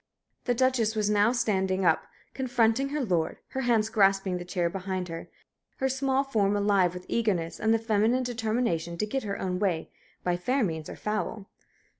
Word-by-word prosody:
The 245 - +1
Duchess 240 -3 +2
was 210 -1 +1
now 210 +2 +4
standing 190 -6 0
up, 160 -2 +2 0.3
confronting 245 0 +1
her 290 -2 -1
lord, 170 -6 0
her 265 - -3
hands 230 -4 +2
grasping 195 -3 +2
the - - -5
chair 175 -1 -1
behind 185 0 -3
her, 165 0 -7 0.5
her 265 - 0
small 265 +1 +1
form 205 -7 +1
alive 200 -3 +2
with 180 0 -8
eagerness 190 -8 -1
and 220 - +2
the 225 - +5
feminine 225 +3 +1
determination 220 -8 -1
to 210 - 0
get 265 +6 -2
her 200 -3 -4
own 180 -1 -2
way, 180 -5 -1 0.3
by 175 -1 +1
fair 250 +9 +1
means 160 -5 -3
or - - -7
foul. 210 -1 -3
210 Hz, 180 wpm, -28 LUFS, 185-240 Hz, 0.5 s, the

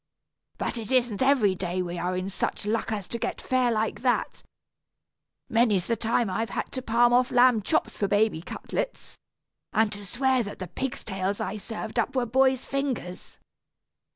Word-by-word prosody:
But 240 - -2
it 220 0 -6
isn't 245 -4 +2
every 260 -8 +4
day 180 0 -2
we 175 0 -4
are 180 +1 -1
in 185 +1 -2
such 195 +1 -2
luck 225 +1 -1
as 205 -4 -3
to 235 - -4
get - - -3
fare 255 -2 +1
like 220 0 -1
that. 250 -1 0 1.1
Many's 220 -6 +2
the 230 - 0
time 230 +1 +1
I've 225 +4 -2
had - - -4
to 260 - -4
palm 240 0 +3
off 250 0 +4
lamb 245 -2 +5
chops 315 +10 0
for 200 - +1
baby 205 -4 +2
cutlets, - - -5 0.6
and 220 -1 +3
to 205 0 -6
swear 255 +5 +1
that 205 -3 -6
the 185 - -5
pig's 265 +7 -4
tails 195 0 -2
I 215 - -3
served 220 +3 -4
up 265 +4 -1
were 255 -2 +2
boy's 260 +2 +2
fingers. 270 -10 -4
225 Hz, 180 wpm, -27 LUFS, 200-250 Hz, 1.1 s, lamb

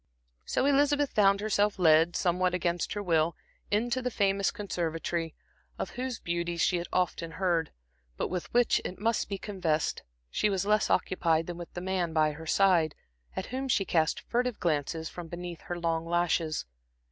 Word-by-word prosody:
So - - 0
Elizabeth 285 0 +3
found 200 -1 +4
herself 210 -1 +1
led, 165 -1 +5
somewhat 180 0 +1
against 175 -1 -1
her 205 - -3
will, 165 -2 +2 0.3
into 235 +5 +1
the 250 - -1
famous 200 -3 +1
conservatory, 170 -4 -3 0.4
of - - -4
whose 255 -1 -4
beauties 170 0 -2
she 180 - +3
had 175 - -4
often 170 -2 -1
heard; 175 -3 0 0.5
but - - -1
with 180 -2 -4
which, 245 0 +3
it 185 - -5
must 225 +2 0
be 200 - -2
confessed, 180 -7 -1 0.3
she 210 - +1
was 195 -1 0
less 210 +1 +2
occupied 165 -3 +2
than 175 0 -6
with 170 - -8
the 175 - -4
man 180 -3 -1
by 155 -1 +3
her 160 +2 -9
side, 175 -4 +3 0.4
at - - -3
whom 265 +1 -2
she 205 -6 +2
cast 160 -4 +1
furtive 245 -1 -1
glances 160 0 -1
from 175 +1 -8
beneath 175 0 -7
her 175 - -5
long 165 -1 -1
lashes. 170 -2 0
180 Hz, 170 wpm, -29 LUFS, 165-205 Hz, 0.5 s, led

